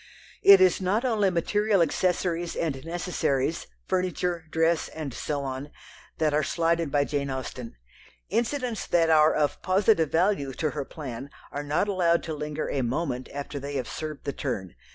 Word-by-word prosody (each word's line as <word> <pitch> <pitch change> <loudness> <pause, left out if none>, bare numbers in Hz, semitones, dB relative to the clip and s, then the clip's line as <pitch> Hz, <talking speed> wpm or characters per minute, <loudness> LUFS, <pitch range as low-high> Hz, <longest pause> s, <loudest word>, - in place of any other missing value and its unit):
It 200 -1 +9
is 185 0 +4
not 205 +7 +1
only 215 -5 +2
material 205 +4 +1
accessories 175 +1 0
and 140 -5 -2
necessaries, 165 -4 -1 0.2
furniture, 180 -2 -1
dress, 165 +1 +1
and 150 -5 -6
so 145 +2 -3
on 135 +2 -5 0.5
that 155 -2 +1
are 150 - +3
slighted 165 0 0
by 145 0 +3
Jane 140 -1 -2
Austen. 130 -2 -5 0.5
Incidents 240 -1 -1
that 165 -2 +3
are 155 0 +5
of 150 -1 0
positive 185 -3 +3
value 165 -6 +1
to 155 +2 -1
her 145 -2 -4
plan 135 -3 -7 0.2
are 145 - -3
not 145 +7 0
allowed 175 -4 +2
to 160 - -4
linger 150 0 -3
a 135 - -1
moment 130 +1 -2
after 145 0 -5
they 140 +1 -6
have 130 -3 -2
served 155 -2 -6
the 140 - -2
turn. 100 - -4
160 Hz, 165 wpm, -27 LUFS, 140-180 Hz, 0.5 s, It